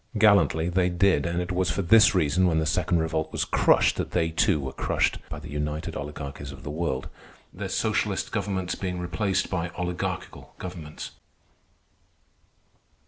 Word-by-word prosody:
Gallantly 100 -6 +4
they 90 0 +2
did; 90 -3 +2
and 85 +1 -1
it 90 +1 -3
was 90 0 +1
for 100 - -1
this 105 +2 +6
reason, 90 +2 +3
when 80 -2 +2
the 80 - +1
Second 85 - +1
Revolt 80 -1 -1
was - - -1
crushed, - - +3
that - - -3
they, 80 - +2
too, 80 - +2
were 65 -1 -5
crushed - - 0
by - - -5
the 75 0 -9
united 75 +2 -3
oligarchies 70 -1 -6
of 70 -1 -12
the 75 - -5
world, 75 -4 -2 0.5
their - - -5
socialist - - 0
governments 95 -3 -2
being 90 -2 -3
replaced 95 +2 -1
by 90 -2 -1
oligarchical 90 -1 -4
governments. 85 -4 -7
85 Hz, 160 wpm, -26 LUFS, 75-90 Hz, 0.5 s, this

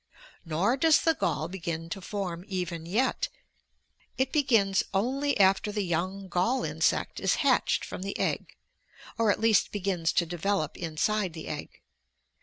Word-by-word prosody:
Nor 185 - +1
does 320 +2 +5
the 325 - +3
gall 160 - -1
begin 170 -2 -4
to 195 - -4
form 180 -3 -4
even 175 -4 -4
yet. 255 - 0 0.9
It 260 0 +1
begins 225 -10 +3
only 270 +6 0
after 195 +2 +4
the 205 -1 -1
young 185 +3 -2
gall 185 +9 +1
insect - - 0
is - - +2
hatched - - +2
from - - -7
the 195 +1 -4
egg, - - -2 0.6
or 225 -2 +3
at - - -1
least 220 -3 +3
begins 185 -5 0
to 170 - +2
develop 175 -1 -1
inside 180 +3 -1
the 160 -1 -8
egg. 150 -1 -7
195 Hz, 150 wpm, -28 LUFS, 170-220 Hz, 0.9 s, does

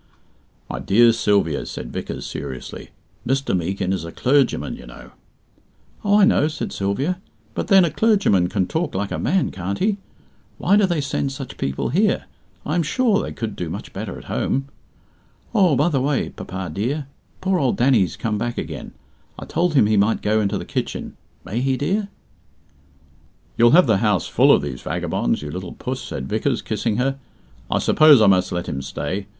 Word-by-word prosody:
"My - - -5
dear 115 - +5
Sylvia," 100 -8 +1
said - - -7
Vickers, - - -5
seriously, 65 - -7 0.3
"Mr. 135 -3 0
Meekin 95 +2 -1
is 95 -4 -3
a 85 - -7
clergyman, 135 +4 +1
you 60 - -12
know." - - -12 0.9
"Oh, 205 +1 +4
I - - +8
know," 195 -8 +3
said 155 0 -4
Sylvia, 135 - -1 0.3
"but - - -3
then, 195 -3 +6
a 165 - -1
clergyman 175 - +3
can 95 -1 0
talk 160 - -2
like 100 +1 -2
a - - -2
man, 190 -1 +1
can't 95 +1 -4
he? 205 +1 +1 0.6
Why 200 - +3
do 205 -2 +4
they 170 -4 0
send 140 0 -2
such 135 -2 -7
people 70 0 -2
here? 195 - +1 0.4
I 150 - -2
am 175 - +2
sure 215 - +1
they - - -5
could 110 -3 -5
do 85 - -4
much - - -7
better - - -5
at - - -11
home. 135 +1 -2 0.8
Oh, 185 -9 +4
by 145 +5 +3
the 140 -5 0
way, 140 0 0
papa 95 0 -6
dear, 135 +9 -2 0.3
poor 190 -1 +1
old 130 -5 +1
Danny's 120 -8 +3
come 105 -2 -2
back 120 +1 -3
again. - - -6 0.4
I - - -7
told 170 -1 0
him 130 - +6
he 105 0 +2
might 105 +3 +2
go 110 +1 +2
into 100 -2 0
the - - -6
kitchen. - - -4 0.3
May 115 +5 -2
he, 135 0 +1
dear?" 195 +9 -1 1.5
"You'll 120 0 +5
have 180 - +7
the 110 -5 +3
house 105 -4 +1
full - - +4
of - - +4
these 65 -4 -5
vagabonds, - - -1
you 75 - -5
little 90 +1 -6
puss," - - -4
said 65 - -5
Vickers, - - -1
kissing 105 - -1
her. 135 +2 0 0.5
"I - - +1
suppose 155 -4 +6
I 110 - +5
must 95 -2 +3
let 85 -1 -3
him 70 - -3
stay. 75 +9 -4
120 Hz, 190 wpm, -21 LUFS, 95-155 Hz, 1.5 s, I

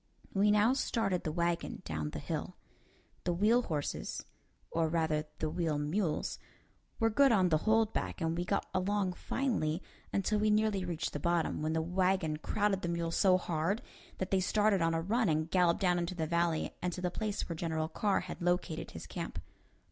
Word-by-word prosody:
We 205 +1 +4
now 210 +4 +5
started 225 -8 0
the 155 - -2
wagon 170 +1 -1
down 80 -2 -3
the - - -6
hill. - - -4 0.7
The 175 - 0
wheel 215 +7 +4
horses 150 -10 -3 0.5
or 165 -1 +1
rather 160 -2 +1
the 155 - -1
wheel 160 -1 -1
mules 155 +3 -1 0.6
were 225 0 +3
good 275 +4 +5
on 190 -5 +4
the 155 -2 +3
hold 225 0 +3
back, - - -2
and 165 -1 0
we 175 - -1
got 200 +2 0
along 190 0 +1
finely 180 - -1 0.3
until 210 +2 +1
we 215 +1 +3
nearly 210 -2 +2
reached 170 -3 -3
the 145 - -3
bottom, 170 0 0
when 155 +1 0
the 160 0 +1
wagon 180 -2 +1
crowded 205 +3 0
the 175 - -2
mules 170 -1 -1
so 185 -2 +5
hard 175 +6 -1 0.3
that 185 - -3
they 190 - +4
started 205 0 +2
on 165 0 +2
a 165 - 0
run 220 +4 +1
and 155 +1 0
galloped 180 -1 +3
down 180 -2 +3
into 175 +2 -3
the 160 -2 -1
valley 170 0 0
and 180 - 0
to 180 - -5
the 180 -1 -1
place 210 +1 -2
where 170 - -4
General 160 -1 -1
Carr 200 +4 +1
had - - -7
located 175 -2 0
his 80 - -8
camp. - - -6
180 Hz, 195 wpm, -32 LUFS, 160-205 Hz, 0.7 s, now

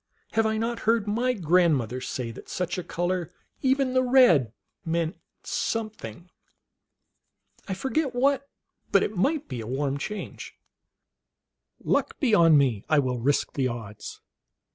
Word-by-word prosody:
Have 225 0 +2
I 220 0 0
not 230 +1 -2
heard 230 -3 +3
my 235 +5 0
grandmother 160 - +2
say 125 -3 -4
that - - -12
such 180 0 -2
a - - -5
color, 175 0 -2 0.3
even 265 -1 +2
the 255 - +4
red, 245 - +5 0.3
meant 165 0 -1 0.3
something? 195 - -4 1.4
I 190 - -2
forget 265 +5 -1
what, 275 +2 +1 0.4
but - - +5
it 215 - -3
might 285 - 0
be 125 -4 -5
a 110 - -7
warm 135 +2 -1
change. 210 +7 -6 1.3
Luck - - 0
be 260 -5 +2
011 165 -5 +6
me, 125 -8 +1
I 155 - +4
will 130 -3 +1
risk 140 +5 0
the 135 -2 0
odds." 110 -4 -7
180 Hz, 140 wpm, -26 LUFS, -, 1.4 s, 011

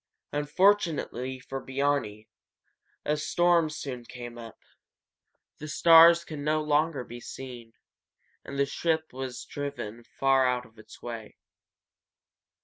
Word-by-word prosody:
Unfortunately 150 - +1
for 135 +1 -6
Biarni, 130 -6 -1 0.8
a 150 - +1
storm 170 +1 +2
soon 135 -5 -6
came 120 0 -9
up. 115 -2 -10 1.0
The 150 - -7
stars 170 +2 +7
could 155 -3 -7
no 155 +2 +1
longer 150 -2 +1
be 120 0 -9
seen, 120 -3 -9 0.7
and 140 - -7
his 140 0 +1
ship 160 -3 -1
was 130 -1 -6
driven 140 -6 -6
far 135 +1 +2
out 125 -1 -1
of 110 -2 -20
its 110 0 -15
way. 115 -3 -7
135 Hz, 120 wpm, -28 LUFS, 120-155 Hz, 1.0 s, stars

